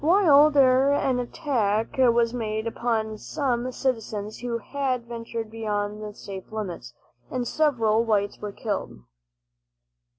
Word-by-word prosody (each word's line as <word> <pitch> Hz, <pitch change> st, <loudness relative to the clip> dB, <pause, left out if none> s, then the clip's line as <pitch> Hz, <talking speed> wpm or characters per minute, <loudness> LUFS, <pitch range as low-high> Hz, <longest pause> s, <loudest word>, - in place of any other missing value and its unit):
While 305 Hz, -4 st, +6 dB
there 270 Hz, -1 st, +4 dB
an 265 Hz, -3 st, +1 dB
attack 230 Hz, -5 st, -1 dB
was 235 Hz, -2 st, +4 dB
made 220 Hz, -2 st, -2 dB
upon 225 Hz, -2 st, -1 dB
some 255 Hz, -3 st, -1 dB
citizens 220 Hz, -5 st, -3 dB
who 240 Hz, -1 st, -2 dB
had 255 Hz, 0 st, -2 dB
ventured 230 Hz, -1 st, -6 dB
beyond 210 Hz, -2 st, -3 dB
the 210 Hz, 0 st, -6 dB
safe 195 Hz, -1 st, -9 dB
limits, 175 Hz, -, -6 dB, 0.3 s
and 250 Hz, -1 st, -2 dB
several 230 Hz, -8 st, +2 dB
whites 205 Hz, -3 st, 0 dB
were 210 Hz, -1 st, -5 dB
killed. 205 Hz, -, -4 dB
230 Hz, 125 wpm, -25 LUFS, 215-255 Hz, 0.3 s, While